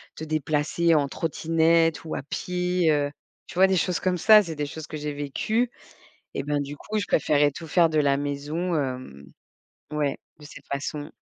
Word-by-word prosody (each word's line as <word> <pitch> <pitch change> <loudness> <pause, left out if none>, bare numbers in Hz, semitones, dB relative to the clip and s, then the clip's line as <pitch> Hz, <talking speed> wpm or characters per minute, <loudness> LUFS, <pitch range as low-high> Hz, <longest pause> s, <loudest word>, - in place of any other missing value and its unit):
te 160 - -7
déplacer 155 +2 +1
en 145 -2 +2
trottinette 165 +1 +1
ou 155 - -5
à - - -3
pied, 180 +1 0
heu 145 -1 +1 0.4
tu - - -11
vois, 190 +1 +6
des 190 - +2
choses 180 0 0
comme 185 -1 0
ça, 215 +4 +7
c'est 165 -4 -6
des 150 - -2
choses 160 +1 -8
que 155 - -7
j'ai 150 0 -3
vécues 215 - -1 0.7
et - - -2
bah 145 0 0
du 145 +1 -5
coup, 215 +6 -4
je 205 - -1
préférerais 145 -1 +3
tout 165 +3 -8
faire 165 +1 +4
de 155 - +1
la 140 -1 +3
maison, 145 +5 -2
hem 125 - -4 0.7
ouais, 150 -2 -1 0.2
de 150 - -13
cette 150 - -13
façon 145 +2 -4
155 Hz, 190 wpm, -25 LUFS, 145-170 Hz, 0.7 s, ça